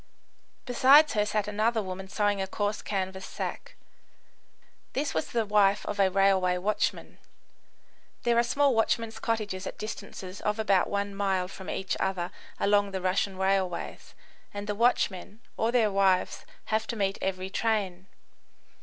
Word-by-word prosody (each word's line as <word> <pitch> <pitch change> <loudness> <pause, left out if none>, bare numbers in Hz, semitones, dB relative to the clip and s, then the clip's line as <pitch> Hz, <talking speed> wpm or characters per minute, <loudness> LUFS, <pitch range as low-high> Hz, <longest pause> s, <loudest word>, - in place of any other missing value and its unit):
Beside 275 +4 +6
her 210 -1 +1
sat 210 -1 -1
another 220 +2 +1
woman 190 0 -6
sewing 205 0 0
a 190 - -2
coarse 205 +2 -2
canvas 190 -1 -3
sack. - - -6 1.2
This 285 +2 -1
was 160 - -1
the 230 -2 -1
wife 205 -1 +3
of 205 - -4
a 195 -1 +5
railway 190 -1 +3
watchman, 205 +4 -2 1.0
[There 235 0 +3
are - - +4
small 280 +3 +2
watchmen's 225 0 0
cottages 205 -4 -2
at - - -7
distances 195 -3 -7
of 210 +1 -1
about 200 -4 +2
one 200 0 -2
mile 195 -2 0
from 190 0 -9
each 190 -1 -2
other 185 -2 -1 0.3
along 205 0 +3
the 190 -1 -3
Russian 185 +1 0
railways, 190 -2 -1 0.4
and 205 0 -6
the 210 - -2
watchmen 210 -3 0 0.2
or 225 +1 0
their 230 -4 +3
wives 195 -2 +1 0.3
have 220 +1 +1
to 235 - -3
meet 195 -2 -1
every 190 0 -2
train. 195 -5 -1
200 Hz, 150 wpm, -28 LUFS, 190-220 Hz, 1.2 s, Beside